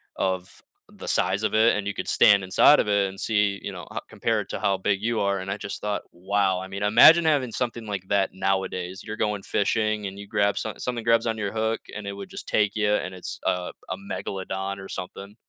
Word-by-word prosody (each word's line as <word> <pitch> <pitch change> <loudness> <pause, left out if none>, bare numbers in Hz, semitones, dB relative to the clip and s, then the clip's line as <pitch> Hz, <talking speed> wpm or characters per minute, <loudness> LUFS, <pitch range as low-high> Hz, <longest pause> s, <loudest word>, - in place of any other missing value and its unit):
of 95 -1 -3 0.3
the - - -11
size 95 +3 +1
of 110 - 0
it, 110 +2 +4
and 105 - -3
you 100 - -2
could - - -5
stand 100 -1 +5
inside 95 +10 +6
of - - +1
it 100 -1 +2
and 95 0 -11
see, 105 -2 +1
you - - -5
know, - - -8
ho - - -3
compare - - -1
it - - -5
to - - -3
how 100 -1 +1
big 95 +1 0
you 115 +1 0
are, 100 -1 +1
and 95 +1 -5
I 100 - -2
just 100 - -6
thought, 105 -1 -2
"Wow." 95 +1 0
I 95 - -7
mean, 100 +1 -6
imagine 120 +11 +7
having 140 -6 +2
something 120 0 -3
like 100 -3 -5
that 100 -1 +1
nowadays, 95 0 -2
you're 110 0 -6
going 105 -2 -1
fishing 110 0 0
and 95 0 -8
you 100 0 -9
grab 100 -1 +1
some 110 - -4
something 120 -2 -3
grabs 115 0 +3
on 115 - 0
to 110 - -6
your 100 -1 -2
hook, 110 0 -1
and 105 -1 -6
it 100 - -3
would 100 0 -8
just - - -8
take 105 -1 +1
you, 105 -1 +2
and 90 - -3
it's 90 - -6
a 90 0 -1 0.2
a - - -3
megalodon 95 - -4
or 95 - -8
something. 100 +2 -7
100 Hz, 245 wpm, -25 LUFS, 95-110 Hz, 0.3 s, imagine